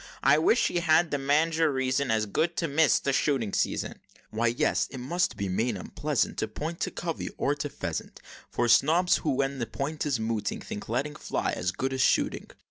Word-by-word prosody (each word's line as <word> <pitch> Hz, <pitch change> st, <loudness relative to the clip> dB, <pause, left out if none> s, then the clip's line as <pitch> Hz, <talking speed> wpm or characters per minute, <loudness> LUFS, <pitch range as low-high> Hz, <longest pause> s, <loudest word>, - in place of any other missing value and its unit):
I 150 Hz, -, +5 dB
wish 225 Hz, +9 st, +3 dB
he 175 Hz, -, 0 dB
had 170 Hz, 0 st, +3 dB
the 145 Hz, -, 0 dB
mange, 155 Hz, +4 st, +2 dB
or 160 Hz, -2 st, +4 dB
reason 130 Hz, 0 st, 0 dB
As 110 Hz, -1 st, +2 dB
good, 165 Hz, +11 st, -1 dB
to 165 Hz, -, 0 dB
miss 155 Hz, +1 st, +4 dB
the 140 Hz, -, -1 dB
shooting 130 Hz, -8 st, +1 dB
season!" -, -, -1 dB, 0.3 s
"Why 115 Hz, +2 st, +1 dB
yes, 120 Hz, +1 st, +1 dB
it 130 Hz, -, -8 dB
must 170 Hz, +9 st, -1 dB
be 100 Hz, -, -2 dB
main 110 Hz, +5 st, 0 dB
upleasant 90 Hz, -, -2 dB
To 110 Hz, -, -1 dB
point 160 Hz, +9 st, -5 dB
to -, -, -1 dB
covey, 165 Hz, -2 st, -4 dB
or 140 Hz, -, +1 dB
to 145 Hz, 0 st, -4 dB
pheasant, -, -, -5 dB, 0.3 s
For 120 Hz, -, 0 dB
snobs, 165 Hz, +9 st, +4 dB
who, 155 Hz, -, -2 dB
when 135 Hz, 0 st, 0 dB
the 115 Hz, -, -2 dB
point 145 Hz, +2 st, -3 dB
is 135 Hz, -5 st, 0 dB
mooting, 110 Hz, -1 st, -2 dB
Think 105 Hz, -, -7 dB
letting 135 Hz, +6 st, -1 dB
fly -, -, -2 dB
as 90 Hz, -, -1 dB
good 130 Hz, +7 st, -3 dB
as 130 Hz, -, 0 dB
shooting!" -, -, +1 dB
140 Hz, 210 wpm, -28 LUFS, 120-155 Hz, 0.3 s, I